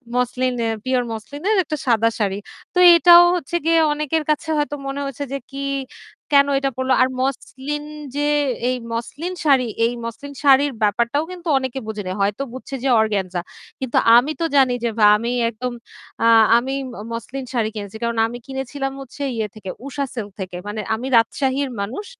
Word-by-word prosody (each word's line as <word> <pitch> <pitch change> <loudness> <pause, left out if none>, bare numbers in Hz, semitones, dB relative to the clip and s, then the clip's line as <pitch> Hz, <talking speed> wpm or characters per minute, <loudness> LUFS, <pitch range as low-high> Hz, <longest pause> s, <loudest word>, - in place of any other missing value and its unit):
Muslin 250 +1 0
এ - - +1 0.2
pure 255 -1 +1
মসলিনের 285 - -2
একটা 305 -1 -4
সাদা 230 -1 +3
শাড়ি। 200 -2 0 0.4
তো - - -4 0.2
এটাও 345 0 +8
হচ্ছে 345 0 -4
গিয়ে 330 0 +4
অনেকের 300 +1 -1
কাছে 310 +2 0
হয়তো 290 0 -1
মনে 275 +1 -3
হচ্ছে 275 +1 -5
যে - - 0
কি, 275 0 -5 0.7
কেন 280 0 +6
এটা 275 0 0
পড়ল। 260 0 -1
আর 255 - +5 0.2
মসলিন 275 +2 -3 0.3
যে 290 - 0 0.5
এই 255 - +1 0.2
মসলিন 290 +10 -4
শাড়ি 275 -4 +4 0.2
এই 235 - 0
মসলিন 230 +5 -7
শাড়ির 280 0 +5
ব্যাপারটাও 235 +8 +1
কিন্তু 355 -1 -9
অনেকে 260 0 -3
বোঝেনি। 210 -4 -4
হয়তো 200 +6 0
বুঝছে 260 +1 -7
যে 270 - +1
অর্গানজা। 190 -5 -1 0.4
কিন্তু 260 -2 -2 0.2
আমি 255 +6 +4
তো - - +2
জানি 265 -3 +5
যে 235 - +1
ভা 210 - +6
আমি 235 +2 -3 0.2
একদম 240 +2 -5 0.5
আ 230 - +5 0.3
আমি 260 +3 -2 0.2
ম - - -11 0.2
মসলিন 260 +4 -5
শাড়ি 230 -3 0
কিনছি। 205 0 -7
কারণ 235 0 -1
আমি 240 - -7
কিনেছিলাম 270 +1 -4
হচ্ছে 270 +2 -11
ইয়ে 220 -2 -1
থেকে 210 -3 -8 0.2
উষা 280 +1 -3
সিল্ক 220 -5 -5
থেকে। 185 -2 -5
মানে 210 +1 -4
আমি 245 +4 -5
রাজশাহীর 265 +4 +1
মানুষ। 250 - -5
260 Hz, 175 wpm, -21 LUFS, 230-285 Hz, 0.7 s, এটাও